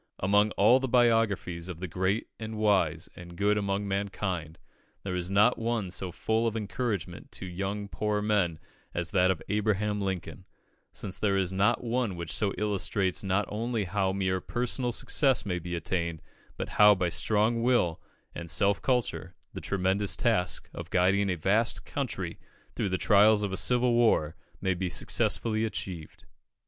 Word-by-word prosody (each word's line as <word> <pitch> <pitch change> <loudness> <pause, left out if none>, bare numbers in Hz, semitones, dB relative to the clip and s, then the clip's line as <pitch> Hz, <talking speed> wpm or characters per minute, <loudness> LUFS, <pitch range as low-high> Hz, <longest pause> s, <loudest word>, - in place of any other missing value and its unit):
Among 105 +3 +3
all 120 +6 +5
the 135 - -2
biographies 115 -8 +1
of 85 -3 -7
the 95 - -4
great 95 +5 -1
and 110 0 -6
wise 95 -6 +1
and 85 -1 -11
good 105 +1 +2
among 100 0 -1
mankind, 95 -5 -3 0.5
there 95 - -3
is 90 0 -2
not 105 +5 +3
one 115 -5 -2
so 90 0 -5
full 110 +5 0
of 115 0 -2
encouragement 100 -5 -4
to 95 +3 -4
poor 105 -1 -1
young 105 - -3
men 95 -7 +1 0.4
as 85 -1 -2
that 95 -2 +3
of 95 -4 -1
Abraham 105 0 0
Lincoln, 95 -1 -4 0.5
since 95 -2 -6
there 100 -2 +1
is 95 -1 0
not 105 +6 +2
one 120 -4 -1
which 85 -2 -5
so 100 -2 +1
illustrates 100 -2 0
not 95 +1 +1
only 115 +1 -2
how 95 +1 0
mere 95 -1 -1
personal 125 +2 -1
success 130 -2 +2
may 90 -3 -2
be 90 +1 -5
attained, 85 -1 -3 0.3
but - - -3
how, 105 0 +6
by 90 -2 0
strong 110 +5 +1
will 115 -9 +1 0.3
and 85 - -7
self 100 +4 +2
culture, 125 -3 -1 0.2
the - - -6
tremendous 95 0 +1
task 90 - 0
of - - -7
guiding 95 +2 +2
a 90 - 0
vast 105 +7 0
country - - -4 0.4
through - - -1
the 95 - 0
trials 105 +1 +5
of 100 - -2
a - - -2
civil 125 +3 +2
war 110 -10 +2 0.3
may 95 -1 +1
be 90 0 -3
successfully 110 +5 +1
achieved. 95 -7 -6
100 Hz, 165 wpm, -28 LUFS, 90-110 Hz, 0.5 s, how